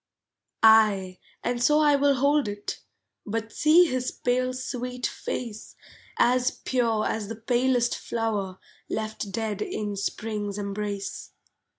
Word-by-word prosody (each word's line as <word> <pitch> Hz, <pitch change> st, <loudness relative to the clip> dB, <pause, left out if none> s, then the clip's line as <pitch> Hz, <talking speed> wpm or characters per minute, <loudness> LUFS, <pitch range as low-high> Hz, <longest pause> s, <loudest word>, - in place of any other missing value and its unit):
Ay, 210 Hz, -5 st, +5 dB, 0.2 s
and 240 Hz, 0 st, -1 dB
so 300 Hz, +5 st, +4 dB
I 295 Hz, -1 st, +5 dB
will 280 Hz, 0 st, +3 dB
hold 280 Hz, 0 st, +2 dB
it, 205 Hz, 0 st, -5 dB, 0.4 s
But 225 Hz, +1 st, -4 dB
see 325 Hz, +4 st, +6 dB
his 255 Hz, -5 st, -1 dB
pale 255 Hz, +1 st, 0 dB
sweet 250 Hz, -1 st, -4 dB
face, 225 Hz, -4 st, -5 dB, 0.4 s
As 250 Hz, +1 st, +3 dB
pure 230 Hz, -4 st, 0 dB
as 215 Hz, -2 st, -2 dB
the 225 Hz, -, -5 dB
palest 240 Hz, +1 st, +1 dB
flower 210 Hz, -5 st, -2 dB, 0.3 s
Left 215 Hz, -2 st, -4 dB
dead 210 Hz, 0 st, -3 dB
in 210 Hz, -1 st, -3 dB
Spring's 205 Hz, 0 st, -3 dB
embrace. 200 Hz, 0 st, -4 dB
225 Hz, 120 wpm, -26 LUFS, 210-255 Hz, 0.4 s, see